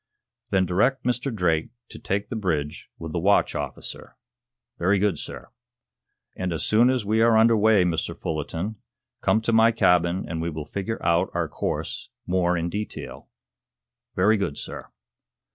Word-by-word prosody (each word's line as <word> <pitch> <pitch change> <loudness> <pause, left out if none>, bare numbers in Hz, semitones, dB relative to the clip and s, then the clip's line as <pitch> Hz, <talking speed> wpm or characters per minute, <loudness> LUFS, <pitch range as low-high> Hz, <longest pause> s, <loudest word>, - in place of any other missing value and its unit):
"Then 95 -1 +2
direct 125 +9 +1
Mr. 125 +2 -1
Drake 85 -7 0 0.2
to - - -10
take 100 +1 -2
the 120 - -4
bridge 80 -8 -2
with 80 -1 -7
the 85 - -1
watch 100 +4 +3
officer." - - -5 0.6
"Very 95 +4 +3
good, 95 -5 +1
sir." - - -8 0.8
"And, 95 -1 -3
as 80 - -2
soon 115 +4 +4
as 130 -5 0
we 110 +2 +2
are 115 -1 +5
under 115 +1 +5
way, 105 -2 +4
Mr. 85 -1 -1
Fullerton, 85 +5 -3 0.4
come 110 - +2
to 115 +1 0
my 115 +1 +6
cabin 90 -4 +2
and 80 -2 -3
we 85 - -1
will 75 -2 -5
figure 100 +8 -3
out 85 +2 +3
our 85 -1 0
course - - -4 0.2
more 90 -1 +1
in 85 0 -1
detail." 105 +4 -6 0.9
"Very 105 +4 +4
good, 85 -8 -2
sir." - - -7
95 Hz, 160 wpm, -25 LUFS, 85-110 Hz, 0.9 s, my